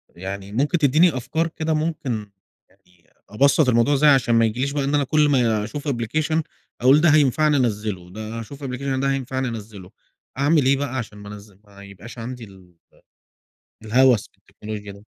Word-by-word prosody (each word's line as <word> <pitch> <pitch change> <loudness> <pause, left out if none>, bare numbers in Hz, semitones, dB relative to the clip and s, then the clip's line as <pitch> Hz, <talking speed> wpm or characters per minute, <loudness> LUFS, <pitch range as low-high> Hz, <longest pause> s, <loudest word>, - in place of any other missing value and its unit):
يعني 95 +2 -7
ممكن 145 - 0
تدّيني 155 +1 +3
أفكار 140 +7 -2
كده 160 -1 -3
ممكن 150 -10 -3 0.4
يعني 90 -1 -31 0.2
أبسَّط 135 +5 +3
الموضوع 120 +4 +3
إزاي 150 +2 +4
عشان 125 -4 +3
ما 115 0 +4
يجيليش 125 +5 -1
بقى 145 -1 -2
إن 140 +2 0
أنا 145 - +2
كل 150 +2 +2
ما 115 -6 +2
أشوف 145 +7 -7
application 150 +5 -1 0.4
أقول 135 +5 +5
ده 170 - +5
هينفعني، 150 0 +3
أنزّله، 105 -7 -2
ده 110 +4 -7
أشوف 140 +6 -10
application 135 0 -3
ده 135 0 0
هينفعني، 130 -1 -2
أنزّله. 105 -5 -8 0.5
أعمل 145 +1 +2
إيه 135 +1 +3
بقى 135 -2 -3
عشان 105 -4 -6
ما 100 0 -11
أنزل 100 -1 -12
ما 100 -1 -16
يبقاش 100 +4 -12
عندي 120 +1 -7
ال 95 -3 -16 0.2
آآ - - -25 0.9
الهَوَس 125 0 +3
بالتكنولوجيا 105 -1 -10
ده؟ 100 +1 -16
125 Hz, 175 wpm, -22 LUFS, 105-145 Hz, 0.9 s, أقول